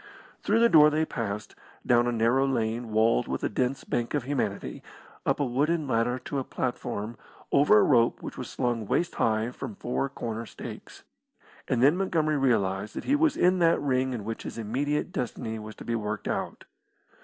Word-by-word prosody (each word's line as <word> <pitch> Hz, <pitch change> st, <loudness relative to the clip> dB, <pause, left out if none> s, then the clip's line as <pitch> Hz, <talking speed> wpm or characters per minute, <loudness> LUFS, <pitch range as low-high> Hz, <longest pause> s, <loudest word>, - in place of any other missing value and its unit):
Through 225 Hz, +3 st, +2 dB
the 235 Hz, -, +7 dB
door 155 Hz, -7 st, +7 dB
they 155 Hz, +1 st, +1 dB
passed, 105 Hz, -6 st, -4 dB, 0.3 s
down 120 Hz, 0 st, +4 dB
a -, -, +1 dB
narrow 120 Hz, +4 st, +2 dB
lane 115 Hz, -2 st, -1 dB
walled 110 Hz, -, +3 dB
with -, -, -3 dB
a -, -, +1 dB
dense 130 Hz, +2 st, -1 dB
bank 120 Hz, +4 st, -2 dB
of 145 Hz, -, 0 dB
humanity, 125 Hz, -7 st, -3 dB, 0.5 s
up -, -, +2 dB
a 145 Hz, -, +2 dB
wooden 145 Hz, +5 st, 0 dB
ladder 120 Hz, 0 st, +1 dB
to 135 Hz, +2 st, -4 dB
a -, -, -2 dB
platform, 120 Hz, -3 st, -4 dB, 0.3 s
over 140 Hz, -6 st, +5 dB
a -, -, +6 dB
rope 120 Hz, -4 st, +3 dB
which -, -, -7 dB
was -, -, -6 dB
slung 120 Hz, -4 st, -2 dB
waist 170 Hz, -, 0 dB
high 110 Hz, +1 st, +1 dB
from 125 Hz, -4 st, -7 dB
four 125 Hz, +5 st, -2 dB
corner 115 Hz, -3 st, -5 dB
stakes, -, -, -10 dB, 0.6 s
and 125 Hz, -1 st, +1 dB
then 145 Hz, +5 st, +6 dB
Montgomery 155 Hz, -6 st, +1 dB
realised 105 Hz, -6 st, +1 dB
that -, -, -4 dB
he 280 Hz, -, +2 dB
was 310 Hz, 0 st, +2 dB
in 180 Hz, +1 st, +3 dB
that 165 Hz, -1 st, +4 dB
ring 130 Hz, -2 st, 0 dB
in 120 Hz, -5 st, -4 dB
which 115 Hz, 0 st, -4 dB
his -, -, -7 dB
immediate 140 Hz, +9 st, -1 dB
destiny 115 Hz, -, -4 dB
was 110 Hz, 0 st, -9 dB
to -, -, -11 dB
be 115 Hz, -, -2 dB
worked 105 Hz, -2 st, -3 dB
out. -, -, -3 dB
125 Hz, 190 wpm, -27 LUFS, 115-145 Hz, 0.6 s, the